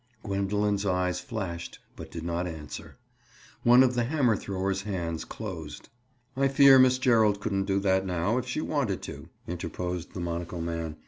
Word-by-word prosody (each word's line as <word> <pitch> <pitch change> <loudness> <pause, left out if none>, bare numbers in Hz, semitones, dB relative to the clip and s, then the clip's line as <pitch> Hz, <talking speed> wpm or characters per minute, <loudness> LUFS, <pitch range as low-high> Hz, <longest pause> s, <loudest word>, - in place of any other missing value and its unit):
Gwendoline's 100 0 0
eyes 90 -2 0
flashed 95 -9 -5 0.2
but - - -8
she - - -8
did - - -8
not 85 +1 -1
answer. 80 -3 -8 0.6
One 120 +2 +7
of 125 -1 +2
the 120 -1 +1
hammer 130 -4 +2
thrower's 95 -1 -2
hands 85 -5 -3
closed. - - -7 0.5
"I 135 +1 +3
fear 135 0 +7
Miss 130 0 +5
Gerald 110 -5 +3
couldn't 100 -2 -1
do 100 0 +1
that 95 -1 +2
now, 95 +6 0
if 125 - -6
she 125 +5 -2
wanted 135 -13 -1
to," - - -8 0.2
interposed 90 0 -4
the - - -4
monocle 85 0 -4
man. 85 -1 -3
100 Hz, 170 wpm, -28 LUFS, 90-120 Hz, 0.6 s, One